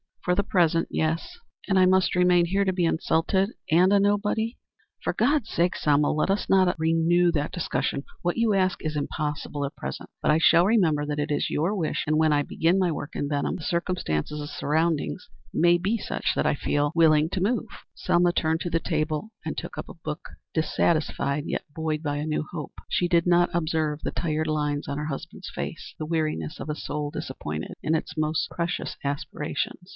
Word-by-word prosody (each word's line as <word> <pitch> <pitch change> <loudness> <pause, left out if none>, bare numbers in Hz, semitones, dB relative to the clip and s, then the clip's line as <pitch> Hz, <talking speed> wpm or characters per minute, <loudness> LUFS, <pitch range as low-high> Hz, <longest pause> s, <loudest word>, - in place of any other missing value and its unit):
"For 180 - +3
the 200 - +2
present, 170 -4 +2
yes." 165 - -1 0.3
"And 195 -1 +3
I 185 - +6
must 185 -1 +3
remain 180 -1 +4
here 195 +3 +1
to 190 -1 +1
be 180 -2 +1
insulted 170 +5 +1 0.2
and 180 +4 +5
a 200 - +5
nobody." 205 +3 +1 0.5
"For - - 0
God's 250 0 +1
sake, 175 +2 +1
Selma, 145 0 +2
let 155 +5 0
us 195 0 0
not 185 -2 +4
renew 165 +2 +3
that 150 -3 -1
discussion. 165 -5 -2 0.2
What 175 0 -1
you 230 -2 +3
ask 185 -1 +1
is 155 -1 -2
impossible 150 0 -3
at 140 - -6
present, 65 0 -6
but - - +1
I 150 - +5
shall 165 +1 +5
remember 165 -9 +2
that 150 0 -2
it 150 +1 -1
is 145 - 0
your 170 +8 0
wish, 165 -6 -1
and 155 +1 +1
when 155 -1 +4
I 145 0 +2
begin 165 +5 +1
my 185 -3 +2
work 150 0 -5
at 145 - -1
Benham 145 -1 -1
the - - -7
circumstances 155 - -1
and 145 0 -5
surroundings 155 +4 -1 0.3
may 175 +1 +4
be 200 +6 0
such - - -2
that - - +1
I - - +3
shall 140 - -8
feel 145 0 +1
willing 155 -2 +5
to 185 - -1
move." 230 +4 0 0.3
Selma 175 0 +2
turned 160 -1 0
to 175 - -2
the 165 - +2
table 155 +4 -2
and 160 - -4
took - - -5
up - - -6
a - - -9
book, 155 -2 -6 0.2
dissatisfied, 150 -2 0
yet - - -3
buoyed 160 -1 -2
by 145 -1 -1
a 150 - -2
new 155 0 0
hope. 150 -5 -6 0.2
She 175 - +1
did 170 -1 +3
not 175 0 +4
observe 155 -2 0
the - - -2
tired 155 -1 -1
lines 150 -1 -1
on 140 - -3
her 150 - -3
husband's 140 -3 -6
face - - -6
the 155 - -3
weariness 155 - -2
of - - -6
a 150 - -1
soul 150 -1 -3
disappointed 75 - -5
in 160 - +2
its 160 0 -3
most 155 +1 0
precious 170 +1 -3
aspirations. 145 +5 -3
160 Hz, 205 wpm, -26 LUFS, 150-180 Hz, 0.5 s, I